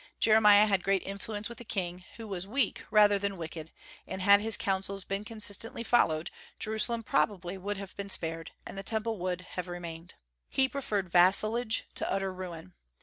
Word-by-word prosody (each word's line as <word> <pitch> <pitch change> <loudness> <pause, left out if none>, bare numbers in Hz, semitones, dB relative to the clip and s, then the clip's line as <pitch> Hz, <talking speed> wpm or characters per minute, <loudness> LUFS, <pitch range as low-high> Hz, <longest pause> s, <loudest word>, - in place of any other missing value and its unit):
Jeremiah 210 -1 +7
had 195 -3 +1
great 195 -1 +1
influence 205 +2 -5
with 235 - -9
the - - -8
king, 180 -4 -4
who 225 -1 -8
was 190 -2 -4
weak 255 +1 -1
rather 205 -1 +5
than 200 -1 -2
wicked, 160 -1 -7 0.4
and - - -5
had 200 +2 +6
his 220 0 +3
counsels 195 -1 -1
been 195 +1 -3
consistently 220 +1 -1
followed, 160 -10 +2 0.3
Jerusalem 220 +2 +1
would - - -21
probably 190 +1 -1
have 195 -1 -8
been 200 0 -6
spared, 165 -3 -2 0.2
and - - -8
the 195 - -5
Temple 220 +1 -2
would, 180 0 -2
have 180 0 -6
remained. 175 0 -8 0.3
He 265 0 +3
preferred 220 -8 -2
vassalage 215 +6 +3
to - - -1
utter 195 -1 -1
ruin. 180 -1 -8
195 Hz, 175 wpm, -30 LUFS, 180-215 Hz, 0.4 s, Jeremiah